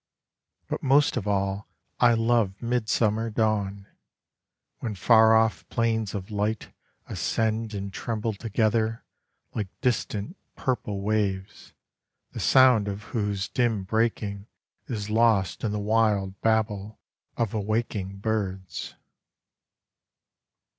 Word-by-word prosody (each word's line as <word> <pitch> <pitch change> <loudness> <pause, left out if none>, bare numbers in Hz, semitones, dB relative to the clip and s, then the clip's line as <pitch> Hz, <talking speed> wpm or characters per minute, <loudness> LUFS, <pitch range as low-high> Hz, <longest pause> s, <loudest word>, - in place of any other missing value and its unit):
But - - -3
most 140 +2 +4
of 105 - -2
all 100 0 -1 0.3
I 120 -1 +6
love 115 -4 +1
midsummer 115 -2 +1
dawn, 105 -3 0 0.9
When 110 -3 -4
far 110 +3 +6
off 110 -1 +1
planes 110 -3 0
of 100 +2 -5
light 105 +1 -2 0.3
ascend 110 -1 -1
and 100 -1 -5
tremble 115 0 -2
together 110 +1 0 0.5
Like 105 -3 -2
distant 120 - -1 0.2
purple 105 -6 -2
waves, 100 -2 -2 0.6
the - - -7
sound 125 -5 +5
of 100 +1 -4
whose 105 -3 -1
dim 115 -5 0
breaking 105 -1 -1 0.4
Is 105 -4 -4
lost 110 -5 +2
in 110 - 0
the 105 - -1
wild 105 -2 +1
babel 110 -2 0 0.4
of 115 -4 0
awaking 105 -2 -2
birds. 95 -6 -3
110 Hz, 105 wpm, -26 LUFS, 100-115 Hz, 0.9 s, I